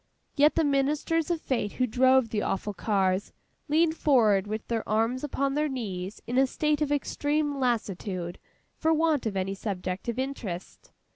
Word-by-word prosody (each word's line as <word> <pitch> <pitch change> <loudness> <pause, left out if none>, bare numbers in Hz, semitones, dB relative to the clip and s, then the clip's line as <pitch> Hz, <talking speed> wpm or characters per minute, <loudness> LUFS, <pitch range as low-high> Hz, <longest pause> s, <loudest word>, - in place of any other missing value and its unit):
Yet, 295 +1 +4
the 325 - +3
Ministers 295 +3 +1
of 340 -2 0
Fate 230 -6 -1
who 255 - +1
drove 260 +1 +4
the 215 -1 -1
awful 205 +1 -2
cars, 195 -1 0 0.4
leaned 320 +2 +3
forward 220 -11 +3
with 215 +1 -4
their 230 -1 -1
arms 225 +5 +1
upon 275 -1 -1
their 300 +1 +1
knees 200 -7 -5
in 245 +2 +1
a 270 - +4
state 300 +2 0
of 295 -1 0
extreme 290 0 0
lassitude, 195 -7 -2 0.4
for 320 - +1
want 315 -5 +2
of 200 -3 -2
any 190 +1 -1
subject 190 0 -4
of 235 - -3
interest. 250 -10 -5
255 Hz, 165 wpm, -27 LUFS, 205-290 Hz, 0.4 s, Yet